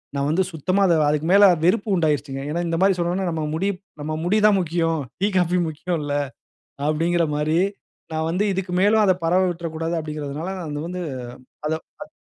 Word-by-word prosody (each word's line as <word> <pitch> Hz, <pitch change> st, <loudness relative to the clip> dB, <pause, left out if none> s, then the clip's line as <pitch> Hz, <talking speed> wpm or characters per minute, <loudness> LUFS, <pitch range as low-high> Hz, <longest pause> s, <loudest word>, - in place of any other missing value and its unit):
நான் 140 Hz, 0 st, 0 dB
வந்து 180 Hz, +5 st, +2 dB
சுத்தமா 185 Hz, +5 st, 0 dB, 0.3 s
அதுக்கு 150 Hz, +2 st, 0 dB
மேலே 200 Hz, +1 st, +8 dB, 0.2 s
வெறுப்பு 205 Hz, +3 st, +2 dB
உண்டாகிருச்சுங்க. 145 Hz, -4 st, 0 dB
ஏனா 170 Hz, +3 st, -1 dB
இந்த 165 Hz, 0 st, -1 dB
மாரி 195 Hz, 0 st, +5 dB
சொன்னோம்னா 175 Hz, +2 st, -1 dB
நம்ம 160 Hz, -1 st, -2 dB
முடி 185 Hz, +5 st, 0 dB, 0.3 s
நம்ம 155 Hz, +1 st, -3 dB
முடி 195 Hz, +5 st, +2 dB
தா -, -, +8 dB
முக்கியம். 165 Hz, -2 st, 0 dB, 0.2 s
டீ, 200 Hz, -, +3 dB
காஃபி 180 Hz, 0 st, +2 dB
முக்கியமில்ல 150 Hz, -2 st, -3 dB, 0.7 s
அப்படீங்குற 165 Hz, +2 st, +1 dB
மாரி 155 Hz, +2 st, +1 dB, 0.5 s
நான் 160 Hz, 0 st, -1 dB
வந்து 185 Hz, +4 st, +1 dB
இதுக்கு 185 Hz, -1 st, -3 dB
மேலும் 215 Hz, +2 st, +4 dB
அத 190 Hz, -, +5 dB
பரவ 180 Hz, +3 st, +3 dB
விட்ற 170 Hz, -1 st, -5 dB
கூடாது 165 Hz, +1 st, -2 dB
அப்டீங்கிறனால 150 Hz, +1 st, -5 dB, 0.4 s
வந்து 180 Hz, +1 st, -4 dB, 0.7 s
அத 160 Hz, 0 st, -6 dB
165 Hz, 160 wpm, -22 LUFS, 155-185 Hz, 0.7 s, மேலே